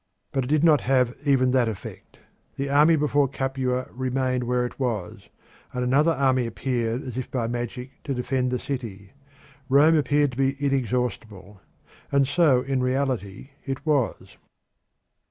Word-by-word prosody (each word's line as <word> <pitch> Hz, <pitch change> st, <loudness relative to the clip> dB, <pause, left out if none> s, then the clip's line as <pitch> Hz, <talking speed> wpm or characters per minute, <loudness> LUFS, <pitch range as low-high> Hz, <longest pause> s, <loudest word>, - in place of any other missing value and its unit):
But 135 Hz, -2 st, -1 dB
it -, -, -6 dB
did 150 Hz, +2 st, +2 dB
not 155 Hz, -3 st, +5 dB
have 125 Hz, -1 st, +1 dB
even 130 Hz, -3 st, +3 dB
that 125 Hz, -2 st, +3 dB
effect. 105 Hz, -4 st, -9 dB, 0.4 s
The 140 Hz, 0 st, -3 dB
army 150 Hz, +3 st, +5 dB
before 145 Hz, -2 st, +2 dB
Capua 130 Hz, -1 st, -2 dB
remained 130 Hz, 0 st, -1 dB
where 125 Hz, 0 st, 0 dB
it 120 Hz, -, -8 dB
was, 115 Hz, -9 st, -3 dB, 0.4 s
and 125 Hz, 0 st, -2 dB
another 145 Hz, +6 st, +3 dB
army 130 Hz, -3 st, +1 dB
appeared 120 Hz, 0 st, -2 dB
as 125 Hz, -2 st, -7 dB
if 130 Hz, -, -6 dB
by 125 Hz, -3 st, -2 dB
magic 120 Hz, +2 st, -4 dB
to 135 Hz, -, -2 dB
defend 125 Hz, +1 st, -1 dB
the 125 Hz, -, -1 dB
city. 110 Hz, -8 st, -6 dB, 0.6 s
Rome 145 Hz, +5 st, +5 dB
appeared 145 Hz, -1 st, +2 dB
to 125 Hz, -, -9 dB
be 135 Hz, 0 st, +1 dB
inexhaustible, 120 Hz, -7 st, -2 dB, 0.5 s
and 140 Hz, -1 st, +3 dB
so 140 Hz, -4 st, +3 dB
in 135 Hz, -1 st, -1 dB
reality 130 Hz, -3 st, -2 dB
it 135 Hz, +1 st, -5 dB
was. 145 Hz, -7 st, -1 dB
130 Hz, 155 wpm, -24 LUFS, 125-140 Hz, 0.6 s, not